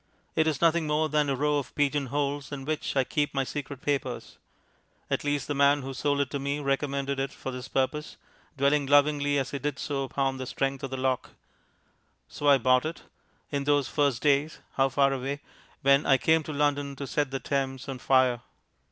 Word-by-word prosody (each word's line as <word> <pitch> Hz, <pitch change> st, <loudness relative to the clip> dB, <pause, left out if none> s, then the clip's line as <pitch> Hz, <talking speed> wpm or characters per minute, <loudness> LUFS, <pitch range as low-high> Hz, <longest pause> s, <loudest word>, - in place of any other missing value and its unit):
It 160 Hz, -, +3 dB
is 150 Hz, -3 st, -1 dB
nothing 165 Hz, -1 st, +3 dB
more 155 Hz, +1 st, +1 dB
than 150 Hz, -1 st, +1 dB
a 135 Hz, -, +1 dB
row 150 Hz, +2 st, +1 dB
of 140 Hz, -, -8 dB
pigeon 145 Hz, -1 st, +1 dB
holes 145 Hz, +2 st, -2 dB
in 135 Hz, -2 st, -6 dB
which 155 Hz, -1 st, -2 dB
I 135 Hz, -, +4 dB
keep 145 Hz, +2 st, -1 dB
my 135 Hz, -, +2 dB
secret 140 Hz, 0 st, -6 dB
papers. 145 Hz, -3 st, -3 dB, 0.7 s
At -, -, 0 dB
least, 145 Hz, -2 st, -1 dB
the 145 Hz, -, -1 dB
man 140 Hz, 0 st, +3 dB
who 135 Hz, +1 st, -5 dB
sold 145 Hz, +1 st, 0 dB
it 140 Hz, -, -2 dB
to 140 Hz, -, -2 dB
me 140 Hz, +2 st, -2 dB
recommended 140 Hz, -1 st, -1 dB
it 135 Hz, 0 st, -1 dB
for 130 Hz, -, -6 dB
this 125 Hz, 0 st, -7 dB
purpose, 140 Hz, +3 st, -2 dB, 0.4 s
dwelling 140 Hz, +1 st, +2 dB
lovingly 145 Hz, 0 st, +3 dB
as 135 Hz, -1 st, -1 dB
he 140 Hz, -, -3 dB
did 145 Hz, 0 st, -2 dB
so 140 Hz, -2 st, -2 dB
upon 135 Hz, 0 st, -1 dB
the 130 Hz, -1 st, -5 dB
strength 135 Hz, +1 st, -2 dB
of 135 Hz, -, -3 dB
the 130 Hz, -, -4 dB
lock. 130 Hz, -1 st, -1 dB, 0.9 s
So 145 Hz, -, -4 dB
I 140 Hz, -1 st, +7 dB
bought 130 Hz, +2 st, +3 dB
it 165 Hz, -, -7 dB, 0.5 s
in 140 Hz, -1 st, -1 dB
those 145 Hz, -2 st, +2 dB
first 140 Hz, -5 st, 0 dB
days 145 Hz, +1 st, +2 dB, 0.2 s
(how 135 Hz, 0 st, +2 dB
far 135 Hz, +1 st, +3 dB
away!) 135 Hz, +2 st, -3 dB, 0.4 s
when 140 Hz, +1 st, +4 dB
I 135 Hz, -, +6 dB
came 160 Hz, +4 st, +3 dB
to -, -, -5 dB
London 145 Hz, -1 st, 0 dB
to 140 Hz, -, -5 dB
set 145 Hz, +1 st, -1 dB
the 135 Hz, 0 st, -3 dB
Thames 135 Hz, -2 st, -2 dB
on 135 Hz, -2 st, -5 dB
fire. 130 Hz, -1 st, +3 dB
140 Hz, 205 wpm, -27 LUFS, 135-145 Hz, 0.9 s, I